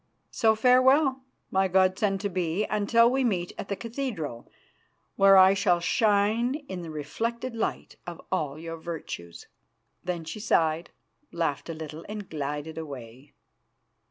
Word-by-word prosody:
So 220 -1 +3
farewell, 260 +4 +4 0.3
my 190 0 +2
god 185 0 +3
son 195 -2 +1
to - - +1
be, 180 +1 -1
until 215 +3 +3
we 265 +1 +1
meet 180 -7 -1
at - - -5
the 200 - -1
cathedral, 215 - -5 0.6
where 195 0 +7
I 190 +1 +8
shall 190 -3 +2
shine 215 +6 +2
in 185 -2 -5
the 170 - -7
reflected 230 - -4
light 225 - -3
of 175 -1 -6
all 150 -6 -1
your 165 +1 -6
virtues." 150 - -7 0.6
Then 175 -2 -3
she 190 +7 -6
sighed, 165 -6 +1 0.4
laughed 165 -2 -2
a 165 - -4
little, 155 0 -8
and 210 -2 -6
glided 150 +1 -4
away. 135 -3 -10
185 Hz, 145 wpm, -27 LUFS, 160-220 Hz, 0.6 s, I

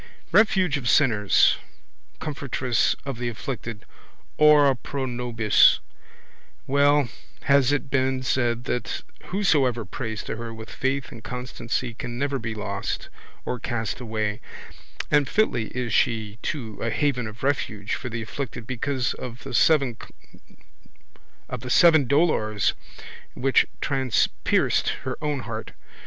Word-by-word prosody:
Refuge 185 -5 +4
of 125 -4 -2
sinners. 105 -9 +4 0.6
Comfortress 135 -5 0
of 135 -4 -4
the 120 -1 -1
afflicted. 115 -2 -6 0.5
Ora 150 -3 +6
pro 135 +2 -4
nobis. 120 -3 +4 0.9
Well 140 -1 +3 0.3
has 140 -1 +4
it 145 -1 -1
been 130 -1 +1
said 120 -2 0
that 125 -1 -3 0.2
whosoever 140 - +1
prays 110 +1 -5
to - - -5
her 115 0 -6
with 110 0 -9
faith 135 0 -2
and 115 - -11
constancy 125 0 -4
can 120 +1 -6
never 140 +1 -1
be 115 -1 -4
lost 100 -1 -4 0.4
or 125 - -3
cast 115 -2 -3
away: 110 -2 -3 0.7
and 145 -2 +3
fitly 130 - +1
is 120 -2 -3
she 110 -2 +1
too 115 -8 -4
a 115 - 0
haven 125 -1 0
of 110 +3 -10
refuge 110 -7 -1
for 125 - -3
the 115 0 -4
afflicted 120 0 -6
because 130 +1 -1
of 125 +1 -8
the - - -7
seven 140 -7 +4 2.1
dolours 110 - +2 0.6
which 135 +1 +3
transpierced 135 -4 +1
her 130 -1 -3
own 150 -3 -1
heart. - - -6
125 Hz, 120 wpm, -25 LUFS, 115-140 Hz, 2.1 s, Ora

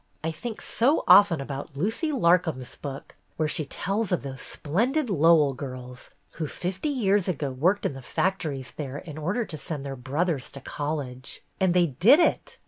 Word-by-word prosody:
I 160 - -1
think 220 +7 -7
so 270 +7 +2
often 200 -6 +7
about 140 +1 -6
Lucy 225 - -1
Lar 180 - +4
com's 130 -8 -6
book, 140 -1 -8 0.2
where 155 - +1
she 155 0 -2
tells 195 +8 -2
of 180 - 0
those 135 -1 -6
splendid 235 - 0
Lowell 160 -4 +5
girls 125 -2 -8 0.3
who 160 - -2
fifty 185 - -3
years 205 -8 +2
ago 145 -6 -2
worked 180 +11 +1
in - - 0
the 135 - -9
factories 145 -3 -2
there 145 -2 -4
in 155 0 -8
order 185 +10 -1
to 155 - -7
send 150 -5 -5
their 135 -1 -4
brothers 140 +3 -1
to 140 - -8
college. 140 -2 -5 0.2
And 185 -2 +2
they 180 -1 +5
did 185 - +5
it! 345 - +1
160 Hz, 180 wpm, -26 LUFS, 140-195 Hz, 0.3 s, often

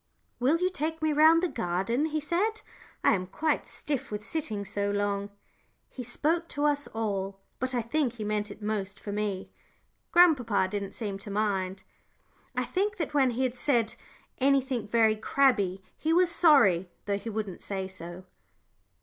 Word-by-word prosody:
"Will 270 +7 +3
you 365 +2 +1
take 320 -2 -3
me 310 -1 +2
round 320 +3 +6
the - - +3
garden?" 230 - -1
he 310 -1 -1
said. 400 +9 0 0.4
"I - - +5
am 185 -2 -1
quite 305 - -1
stiff 285 -4 -3
with 210 0 -5
sitting 220 -8 -3
so 200 0 -1
long." 200 0 -1 0.6
He 260 - -7
spoke 320 +8 0
to 290 -2 -2
us 290 -1 +1
all, 195 -3 -3 0.2
but 255 0 -1
I 240 - 0
think 260 +1 0
he 225 -3 -6
meant 210 0 -1
it 205 +1 -10
most 205 -2 -3
for 205 - -6
me. 205 -2 -3 0.6
Grandpapa 250 - +4
didn't 200 -1 -3
seem 200 -4 -4
to 205 - -9
mind. 195 -2 -1 0.7
I - - +1
think 400 +2 -1
that 320 -4 -3
when 275 -3 +4
he 245 +2 -1
had 255 -2 0
said 245 -3 +1 0.5
anything 265 -4 +2
very 220 0 +4
crabbed, 215 -5 +2 0.2
he 320 +1 0
was 355 0 +4
sorry, 200 - +5 0.2
though 200 -1 0
he 220 +3 -6
wouldn't 210 -4 -4
say 190 -1 -3
so. 185 -1 -9
230 Hz, 170 wpm, -28 LUFS, 200-295 Hz, 0.7 s, round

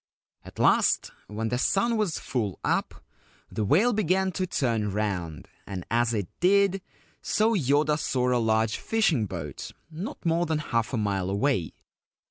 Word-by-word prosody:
At - - -13
last, - - +3 0.2
when 110 +2 -3
the 125 +1 -1
sun 230 - +2
was 210 -7 0
full 105 -7 -3
up, - - -1 0.5
the 110 - -2
whale 195 - +3
began 190 -2 +1
to 185 +1 -2
turn 115 - 0
round, 95 -6 -3 0.2
and 95 -3 -6
as 120 0 +2
it 105 -6 -2
did 195 +1 +3 0.4
so 220 +2 +2
Yoda 150 - +2
saw 125 -3 +1
a 120 - +2
large 110 0 +1
fishing 175 - +1
boat 80 -7 -6 0.2
not 175 +4 -7
more 170 +1 +1
than 160 -1 0
half 115 -7 -1
a 130 - -1
mile 100 -3 -1
away. 100 - 0
125 Hz, 155 wpm, -26 LUFS, -, 0.5 s, last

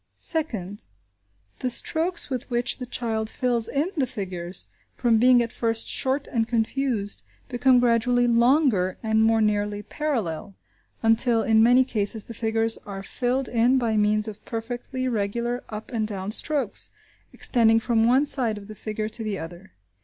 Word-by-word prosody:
Second. 215 - -2 0.7
The 255 - -1
strokes 335 +7 +1
with 260 -1 -5
which 245 +1 -1
the 250 - -6
child 220 -3 -2
fills 240 -3 0
in 290 +5 -1
the 275 -5 0
figures, 185 -6 -5 0.3
from 235 -3 +2
being 245 0 +5
at 230 - -5
first 225 -2 0
short 270 +1 +1
and 225 -2 -1
confused, 230 -2 -1 0.3
become 255 0 +4
gradually 245 0 +2
longer, 235 - +3
and 220 0 +2
more 225 0 +3
nearly 205 -1 0
parallel, 215 - -3 0.5
until 225 0 +3
in 220 0 +4
many 245 +3 +6
cases 215 -3 +1
the 230 - -9
figures 225 0 0
are 195 -1 -8
filled 250 +5 -1
in 245 +3 +3
by 230 -3 0
means 210 +1 +2
of 215 -1 -8
perfectly 245 +3 -4
regular 235 +2 -2
up 215 +1 -7
and 220 -3 -1
down 195 -1 -4
strokes, 280 -1 -2 0.4
extending 225 -2 +3
from 225 -1 +1
one 255 +5 +4
side 240 -7 +2
of 200 -1 -10
the 215 - -8
figure 215 +1 -4
to 225 +1 -4
the 210 -2 -3
other. 175 +3 -9
230 Hz, 160 wpm, -24 LUFS, 215-250 Hz, 0.7 s, many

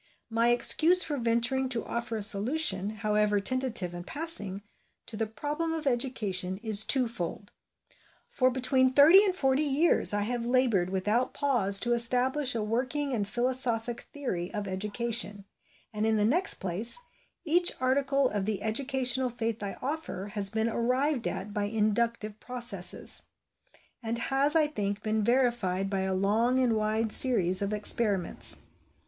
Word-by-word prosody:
My 230 +1 +1
excuse 320 +9 +4
for 295 - -4
venturing 240 +2 0
to 235 -3 -3
offer 235 -1 -4
a 210 - -4
solution, 210 -1 +2
however 210 -1 0
tentative 235 -5 +1
and 175 0 -8
passing, 205 - -2 0.4
to 225 - -7
the 220 0 -3
problem 295 +9 -4
of 320 -1 -5
education 215 -8 -1
is 220 -2 +4
twofold. 225 -8 -3 0.8
For 255 0 +1
between 260 0 +1
thirty 315 +9 +7
and 380 -3 0
forty 270 -4 +1
years 300 +3 +2
I 205 0 -1
have 240 +2 -3
laboured 235 -7 +1
without 210 +7 -2
pause 215 -9 +1
to 240 0 +1
establish 250 +3 +3
a 220 - -2
working 260 +6 -2
and 205 -4 -2
philosophic 240 0 +1
theory 190 - -5
of 205 -1 -5
education; 210 +1 -3 0.5
and 210 0 -3
in 220 0 +1
the 210 - +2
next 345 - +3
place, 190 - 0 0.5
each 345 +3 +3
article 270 +1 0
of 205 -5 -3
the 205 -2 -3
educational 260 +2 +1
faith 230 -2 -4
I 200 -1 -6
offer 270 - -5
has 200 -2 +2
been 220 +2 -2
arrived 250 +3 -1
at 205 +1 -6
by 205 -1 -2
inductive 215 0 -2
processes; 235 -8 -1 0.8
and 230 0 -4
has, 275 +5 0
I 315 -1 +4
think, 205 -8 -4
been 215 0 -1
verified 235 -6 0
by 195 - -1
a 190 0 -2
long 220 +7 0
and 250 -3 +1
wide 215 +1 -1
series 190 -9 +3
of 200 0 -2
experiments. 210 -3 +2
235 Hz, 150 wpm, -27 LUFS, 205-260 Hz, 0.8 s, thirty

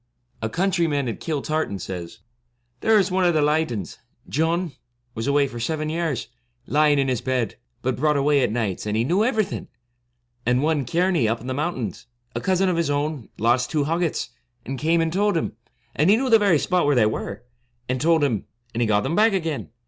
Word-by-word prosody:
A 110 - -1
countryman 165 - +1
at 115 - -4
Kiltartan 155 -7 -2
says, 90 -2 -7 0.3
* 120 0 -47
There 220 - +4
was 195 -2 +2
one 185 0 +2
of 175 -2 +3
the - - +4
67 - - +3
Lydons 150 - -1 0.2
— - - -25
John 165 +2 +1 0.2
— 120 0 -47
was 115 +1 -4
away 140 0 +3
for 120 -3 -7
seven 155 +5 -2
years, 160 -5 -2 0.4
lying 150 +1 +3
in 135 -1 +2
his 125 -4 0
bed, 130 -4 -1 0.3
but 130 -1 0
brought 150 +1 +2
away 140 0 +3
at 120 - +1
nights, 105 -4 -2
and 105 +1 0
he 115 - +2
knew 180 - +2
everything; 220 -4 -1 0.8
and 125 +3 +2
one, 155 -3 +1
Kearney, 170 -3 +2
up 115 +2 0
in 120 - -11
the 130 - -2
mountains, 130 - -3 0.3
a - - -2
cousin 190 0 +2
of 180 -2 +1
his 165 -3 +1
own, 145 -3 -2
lost 120 +3 +2
two 150 -3 +1
hoggets, 165 +2 -1 0.4
and 135 0 -4
came 165 +2 +2
and 165 0 -1
told 205 -1 +2
him, - - -2 0.4
and 155 +5 +3
he 205 - +7
knew 260 0 -1
the 225 - +7
very 200 -6 +4
spot 180 +1 +1
where 145 - +3
they 115 -3 +5
were, 105 -2 -3 0.4
and 130 0 -1
told 165 0 +3
him, 120 -8 0 0.3
and 120 - -1
he 115 - +2
got 105 -1 +3
them 150 +6 -1
back 220 +1 +4
again. 165 -6 -2
145 Hz, 215 wpm, -23 LUFS, 120-170 Hz, 0.8 s, he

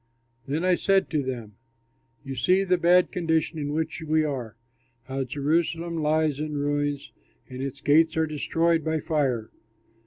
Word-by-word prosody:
Then 155 +6 -1
I 185 - +4
said 195 +2 +2
to 155 -3 +1
them, 120 -6 -6 0.7
"You 135 -1 -6
see 180 +11 +3
the 180 -2 +1
bad 175 +1 +4
condition 160 -2 0
in 145 -1 -3
which 160 +2 -2
we 155 0 +1
are, 125 -7 -4 0.5
how 135 0 -3
Jerusalem 165 +4 -1
lies 155 -1 +1
in 150 -1 -3
ruins 145 0 -1 0.4
and 130 0 -7
its 135 0 -5
gates 160 +2 +3
are 160 - +3
destroyed 165 +2 0
by 160 +1 0
fire. 135 -8 -1
155 Hz, 155 wpm, -26 LUFS, 140-165 Hz, 0.7 s, I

